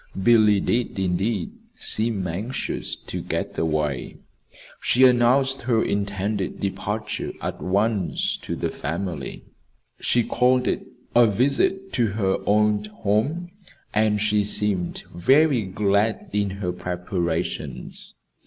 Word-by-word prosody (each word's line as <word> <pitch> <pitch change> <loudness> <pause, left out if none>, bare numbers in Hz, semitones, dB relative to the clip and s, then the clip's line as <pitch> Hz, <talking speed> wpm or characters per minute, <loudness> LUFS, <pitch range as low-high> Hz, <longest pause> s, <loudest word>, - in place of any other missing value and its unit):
Billy 110 -2 +5
did, 120 +3 -1
indeed, 95 - -1 0.2
seem 110 -4 0
anxious 100 +9 -3
to - - -6
get - - -3
away. 75 -4 -1 0.6
She 130 - +3
announced 130 +2 +4
her 120 -2 +2
intended 100 0 -2
departure 105 +2 -3
at - - -5
once 100 0 0
to - - -5
the - - -2
family. 80 0 -4 0.6
She 120 - +2
called 125 +2 +2
it - - -1 0.3
a 120 -1 +7
visit 140 - +1
to 120 -3 +2
her 95 -3 +1
old 105 0 +2
home, 110 - -1 0.4
and 105 -1 +2
she 105 0 +2
seemed 100 -3 +1
very 135 - +4
glad 100 +2 0
in 105 -1 +1
her 95 -2 -3
preparations. 85 -7 -4
105 Hz, 115 wpm, -24 LUFS, 95-120 Hz, 0.6 s, a